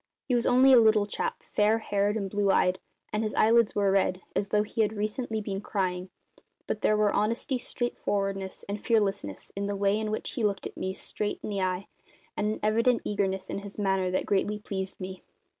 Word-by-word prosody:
He 255 - 0
was 240 -1 +2
only 260 +2 +6
a 250 - +9
little 215 -2 +5
chap, 460 - -3
fair 210 +2 +4
haired 205 -1 0
and 200 -2 -2
blue 205 0 0
eyed, 185 -1 +3 0.3
and 210 - +1
his 215 -1 -2
eyelids 230 0 +4
were 200 -1 +3
red, 190 -1 +1
as 200 - 0
though 210 0 +3
he 225 +2 -2
had 215 0 +1
recently 215 +2 -2
been 195 -1 -4
crying; 185 -3 -2 0.6
but 210 - -3
there 215 - +3
were 210 -1 +3
honesty, 230 +5 0
straightforwardness, 195 -6 -3
and 200 +1 -4
fearlessness 200 - 0
in 200 0 -2
the 205 - -2
way 200 +1 +2
in 215 -1 -2
which 215 - -3
he 235 - -3
looked 200 -2 0
me 190 0 -3
straight 205 +1 -3
in - - -4
the 200 -1 -1
eye, 185 0 0 0.5
and 210 - 0
an 215 - -4
evident 230 +3 +3
eagerness 190 -2 -1
in - - -3
his 200 0 -10
manner 195 -2 +1
that 185 - -1
greatly 205 +1 +1
pleased 190 -2 -5
me. 185 0 -6
205 Hz, 205 wpm, -28 LUFS, 195-220 Hz, 0.6 s, a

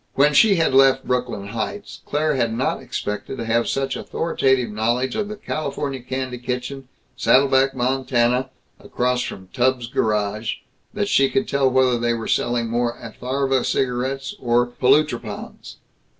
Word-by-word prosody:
When 145 +2 +4
she 200 +7 +6
had 165 -5 +1
left 135 0 +5
Brooklyn 125 -6 -2
Heights, 115 - -5
Claire 150 +1 +1
had 120 -4 0
not 130 - -1
expected 105 +5 -5
to 115 - -4
have 115 +1 +1
such 135 0 -1
authoritative 130 -7 0
knowledge 120 +4 0
of 210 - -1
the 215 - -6
Kalifornia 140 -7 -4
Kandy 130 -1 -3
Kitchen, 125 +2 -4 0.3
Saddle 135 +2 +4
Back, 135 0 +2
Montana, 125 0 +1 0.3
across 125 0 -1
from 95 -5 -7
Tubbs' 130 -1 +1
Garage, 105 -1 -1 0.4
that 205 -1 0
she 135 -7 +3
could 200 +2 0
tell 140 -1 +2
whether 130 -2 +3
they 120 0 +1
were 115 -1 -5
selling 120 -1 0
more 120 +1 -1
Atharva 130 +3 -1
Cigarettes 135 +1 -1
or 120 0 +2
Polutropons. 125 -3 -1
130 Hz, 150 wpm, -22 LUFS, 120-135 Hz, 0.4 s, she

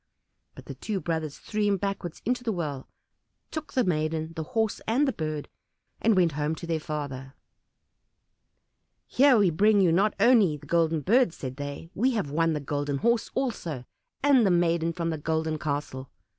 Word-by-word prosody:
But - - -12
the - - -7
two 210 -3 -3
brothers 160 -3 -3
threw 215 -1 -4
him 205 -1 +2
backwards 195 -3 -4
into 245 +2 0
the 230 - 0
well, 150 -8 -4 0.6
took 315 -1 -6
the 255 - +2
maiden, 160 -2 -1
the 160 - -3 0.2
Horse, 220 -1 +1
and 260 +6 +2
the 270 - 0
Bird, 155 -4 -4 0.5
and 225 -1 +4
went 175 -3 +3
home 150 +2 -1
to 170 - -8
their 165 -1 -1
father. 140 -4 -6 1.7
"Here 265 -1 +5
we 200 -5 +4
bring 205 +5 +4
you 180 -4 +4
not 200 +5 +2
only 215 -11 +5
the 145 - -15
Golden 165 0 +1
Bird," 230 - +3
said 130 -4 -7
they; 145 +3 -6
"we 250 +7 +1
have 200 -11 -2
won 165 +2 +2
the 150 - -1
Golden 145 0 -2
Horse 235 +8 +1
also, 170 - -3 0.4
and 280 -4 +5
the 200 - +3
maiden 170 -1 +2
from 170 -1 -2
the 160 - -4
Golden 160 0 -1
Castle." 140 -3 -4
165 Hz, 180 wpm, -27 LUFS, 150-215 Hz, 1.7 s, Here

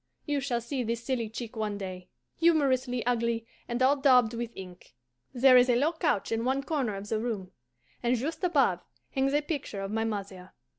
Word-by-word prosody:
You 290 -1 0
shall 255 -4 -1
see 255 +3 -3
this 230 0 -2
silly 235 -4 -2
chick 225 +1 -7
one 215 -2 -2
day, 185 -2 -7 0.3
humorously 265 -7 +2
ugly 235 -1 0 0.2
and 240 +1 -1
all 270 +2 +5
daubed 250 -5 +4
with 235 0 -3
ink. 180 -6 -11 0.4
There 255 0 +6
is 250 +1 +5
a 245 - +4
low 295 +7 +2
couch 305 - 0
in 225 0 0
one 265 +2 0
corner 270 -9 -1
of 200 +1 -7
the 220 - 0
room, 215 -5 -4 0.5
and 245 +1 +2
just 315 +8 -4
above 270 - +2 0.3
hangs 270 +1 +1
a 295 - +2
picture 285 -10 -4
of 195 0 -4
my 225 +1 0
mother. 195 -4 -5
240 Hz, 195 wpm, -29 LUFS, 215-270 Hz, 0.5 s, There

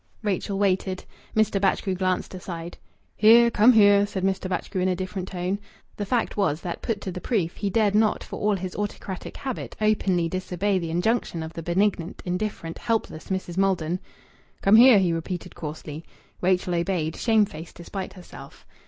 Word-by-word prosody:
Rachel 200 -1 -1
waited. 190 -1 0 0.3
Mr. 215 -2 +2
Batchgrew 195 0 +1
glanced 185 0 -1
aside. 175 -2 -7 0.4
"Here! 235 +2 +7
Come 225 +3 +6
here!" 205 -2 +6
said 195 -2 -4
Mr. 190 -1 0
Batchgrew 185 0 -2
in 185 - +2
a 185 - +1
different 185 0 -4
tone. 185 +2 -2 0.4
The 205 - -4
fact 240 +1 0
was 170 -6 0
that, 175 - -5
put 215 -3 -2
to 190 - -4
the 180 - -6
proof, 185 -9 -1
he 200 - -1
dared 210 0 +2
not, 215 0 +2
for - - -7
all 210 0 +2
his 185 -1 -5
autocratic 205 -2 -5
habit, 265 -3 -5
openly 200 -5 +2
disobey 185 +2 -1
the 170 -2 -4
injunction 175 -1 0
of 160 +1 -7
the 165 - -6
benignant, 175 0 0
indifferent, 180 -2 -3
helpless 225 -8 -2
Mrs. 185 -2 -3
Maldon. 185 -3 +1 0.6
"Come 200 +2 +6
here!" 245 -1 +9
he 180 -3 +2
repeated 165 +1 -4
coarsely. 155 0 -7 0.4
Rachel 180 0 +1
obeyed, 170 -2 -1
shamefaced 205 -8 0
despite 190 +3 -6
herself. 170 -7 -13
190 Hz, 170 wpm, -25 LUFS, 175-205 Hz, 0.6 s, here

